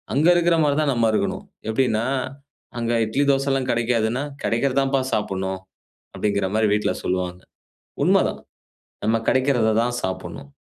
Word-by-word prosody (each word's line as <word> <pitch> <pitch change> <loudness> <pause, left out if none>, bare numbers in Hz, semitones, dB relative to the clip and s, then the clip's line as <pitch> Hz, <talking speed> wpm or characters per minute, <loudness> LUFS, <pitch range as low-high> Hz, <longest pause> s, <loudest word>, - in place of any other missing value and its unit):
அங்க 150 +4 +3
இருக்கிற 175 -1 +3
மாதிரி 145 -1 +2
தான் 145 -3 +1
நம்ம 115 -2 +2
இருக்கணும். - - -1 0.2
எப்டின்னா, 110 -1 +1 0.7
அங்க 115 0 -1
இட்லி 135 +7 0
தோசை 135 0 +2
எல்லாம் 135 -1 0
கெடைக்காதுன்னா, 120 +2 0 0.2
"கெடைக்கிறது 125 +3 0
தான்ப்பா 135 0 +1
சாப்பிடணும்." 95 -2 -2 0.6
அப்டிங்கிற 100 -2 0
மாதிரி 110 0 +3
வீட்ல 105 0 +1
சொல்வாங்க. 90 -1 -2 0.6
உண்மதான். - - +2 0.6
நம்ம 115 +1 +2
கெடைக்கிறத 130 -4 +2
தான் 120 0 -1
சாப்பிடணும். 95 -6 -5
115 Hz, 135 wpm, -22 LUFS, 105-135 Hz, 0.7 s, அங்க